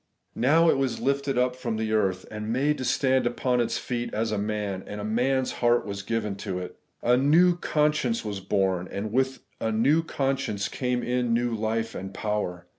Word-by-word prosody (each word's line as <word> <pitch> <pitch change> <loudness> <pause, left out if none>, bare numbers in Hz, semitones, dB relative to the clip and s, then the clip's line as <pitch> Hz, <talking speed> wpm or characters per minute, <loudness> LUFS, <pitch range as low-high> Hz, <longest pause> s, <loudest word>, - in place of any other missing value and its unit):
Now 160 +7 +4
' - - +7
it - - 0
was 135 -3 -1
lifted 140 -1 0
up 125 0 +2
from 120 -4 -3
the 110 0 -2
earth, 95 -4 +1
and 110 0 -4
made 145 +5 +1
to - - -3
stand 130 -2 +2
upon 125 0 +1
its 120 - -1
feet 120 -1 -3
as 110 +1 0
a 105 - 0
man, 105 -2 -2
and 105 - -6
a - - -4
man's 130 +4 +1
heart 120 0 +3
was 100 -1 -4
given 105 -1 -2
to 100 -2 -4
it.' 90 -1 -6 0.3
A 120 +1 +4
new 165 +7 +5
conscierice 150 -9 0
was 100 -2 -3
bom; 95 -2 0
and 105 +2 -4
with 130 +1 0 0.2
a 110 - -1
new 135 +9 +3
conscience 135 -10 -1
came 125 -1 -1
in 125 -1 +1
new 120 0 0
life 115 +1 -1
and 95 +1 -7
power. 105 -5 -2
120 Hz, 200 wpm, -26 LUFS, 105-130 Hz, 0.3 s, '